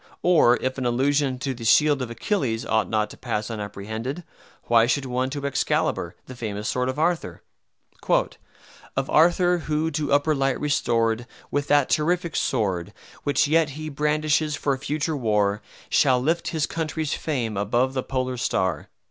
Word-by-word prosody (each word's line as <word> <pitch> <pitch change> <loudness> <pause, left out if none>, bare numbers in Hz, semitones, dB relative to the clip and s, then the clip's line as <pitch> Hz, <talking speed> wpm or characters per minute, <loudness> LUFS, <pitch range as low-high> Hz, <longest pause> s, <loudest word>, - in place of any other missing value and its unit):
Or 155 -9 +5
if 130 +1 -2
an 130 - -2
allusion 135 +2 +1
to 135 +1 -3
the 120 -2 -9
shield 145 +5 +4
of 125 - -3
Achilles 115 - -1
ought 110 -4 +1
not 110 -1 0
to - - -12
pass 105 +2 -3
unapprehended, 110 - -5 0.4
why 115 0 +4
should 135 +2 0
one 130 +1 -1
to 140 0 -5
Excalibar, 140 - 0
the 130 - -9
famous 105 -3 -4
sword 125 0 0
of 130 - -4
Arthur? 160 - -1 1.5
"Of 135 - -1
Arthur, 175 +2 +4
who, 155 0 -1
to 150 -1 -2
upper 145 +2 +3
light 135 -2 0
restored, 120 -5 0 0.2
With 145 0 -1
that 145 -2 +4
terrific 170 +2 0
sword, 90 -5 -1 0.3
Which 145 0 +2
yet 160 0 +3
he 155 0 -5
brandishes 150 +1 +1
for 140 -1 0
future 150 +3 -2
war, 105 -5 +1 0.3
Shall 130 -1 +3
lift 165 +6 0
his 155 -2 0
country's 160 -2 -3
fame 120 -8 -2
above 120 +6 +1
the 130 - -1
polar 130 -1 -2
star." 95 -9 -1
135 Hz, 160 wpm, -24 LUFS, 115-150 Hz, 1.5 s, Or